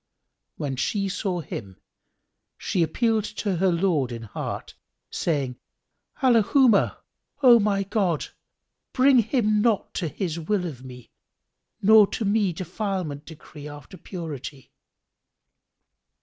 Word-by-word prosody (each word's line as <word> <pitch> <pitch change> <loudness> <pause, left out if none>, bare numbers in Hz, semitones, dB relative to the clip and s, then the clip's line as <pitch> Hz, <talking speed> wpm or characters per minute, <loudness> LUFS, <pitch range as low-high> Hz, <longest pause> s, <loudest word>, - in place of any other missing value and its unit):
When 135 -3 -3
she 195 - -1
saw 190 -3 -2
him, 100 - -8 0.8
she 180 - -1
appealed 220 +7 +1
to 200 -4 -1
her 185 +1 +2
Lord 165 -7 +1
in 115 -1 -6
heart, 105 - -6 0.4
saying, 140 -7 -2 0.6
"Allahumma 240 -2 +4 0.5
O 240 -2 +8
my 200 -2 +1
God 195 -6 0 0.7
bring 260 -1 +5
him 215 -2 +1
not 220 -2 +1
to 175 - -2
his 165 +2 -3
will 180 +3 -1
of 135 -7 -7
me 125 -2 -12 0.7
nor 215 0 +7
to 220 - -3
me 200 -2 +2
defilement 180 -4 -4
decree 150 -2 -11
after 145 +3 -11
purity!" 150 -8 -8
185 Hz, 115 wpm, -25 LUFS, 150-210 Hz, 0.8 s, O